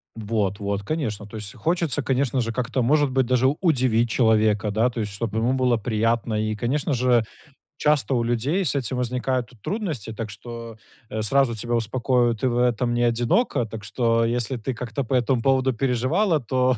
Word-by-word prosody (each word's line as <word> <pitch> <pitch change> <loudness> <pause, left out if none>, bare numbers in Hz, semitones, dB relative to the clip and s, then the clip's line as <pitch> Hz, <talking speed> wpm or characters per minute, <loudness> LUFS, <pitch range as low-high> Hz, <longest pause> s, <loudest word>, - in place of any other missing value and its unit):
Вот 105 -3 -1
вот, 100 0 -2
конечно, 110 -7 -3
то 110 - -11
есть 105 -2 -6
хочется, 165 -4 0
конечно 130 -1 0
же, 115 -1 -1
как-то 125 +1 -1
может 145 +2 +3
быть 130 -1 +2
даже 130 +1 +2
удивить 125 -9 +2
человека 110 -3 +2
да, 115 +4 +2
то 115 -2 -4
есть 105 -1 -4
чтобы 110 +1 -3
ему 120 +3 +1
было 130 -2 +2
приятно. 115 0 0
И, 110 0 -1
конечно 135 +6 -1
же, 120 -2 +3 0.5
часто 150 -2 +2
у 120 -2 +1
людей 135 - 0
с - - -1
этим 130 -1 -2
возникают 125 0 -1
трудности, 160 - -3
так 110 0 -5
что, 115 +1 -8 0.3
э, 110 0 -3
сразу 120 +1 +2
тебя 120 +2 -2
успокою: 120 +1 +1
ты 130 +4 0
в 120 - -1
этом 120 0 +1
не 120 0 +1
одинока. 120 - +1
Так 110 -2 -8
что, 115 +2 +1
если 120 +2 -1
ты 125 +3 -3
как-то 120 +2 -4
по 130 - -3
этому 125 -1 +2
поводу 130 0 +2
переживала, 135 - +1
то 130 +1 +1
120 Hz, 185 wpm, -24 LUFS, 110-130 Hz, 0.5 s, может